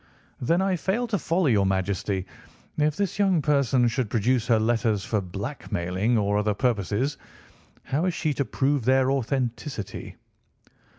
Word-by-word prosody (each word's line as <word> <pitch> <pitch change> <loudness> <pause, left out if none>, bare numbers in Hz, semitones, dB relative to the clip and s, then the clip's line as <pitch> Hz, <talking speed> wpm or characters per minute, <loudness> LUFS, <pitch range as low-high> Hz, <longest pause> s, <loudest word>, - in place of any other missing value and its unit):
"Then 170 +9 +2
I 190 -2 +1
fail 195 +9 0
to 205 -4 0
follow 170 +3 0
your 105 -8 +3
Majesty. 95 0 -1 0.5
If 150 0 +1
this 200 0 -2
young 190 -4 +3
person 140 -4 +2
should 120 -1 -1
produce 120 +2 +1
her 115 -3 +4
letters 110 -2 +1
for 105 -3 0
blackmailing 95 0 -2
or 105 -1 +1
other 105 -1 0
purposes, 120 +4 0 0.6
how 150 +6 -1
is 180 - +1
she 155 -2 0
to 140 - 0
prove 140 0 0
their 130 +1 +3
authenticity?" 125 - -3
125 Hz, 145 wpm, -25 LUFS, 105-150 Hz, 0.6 s, her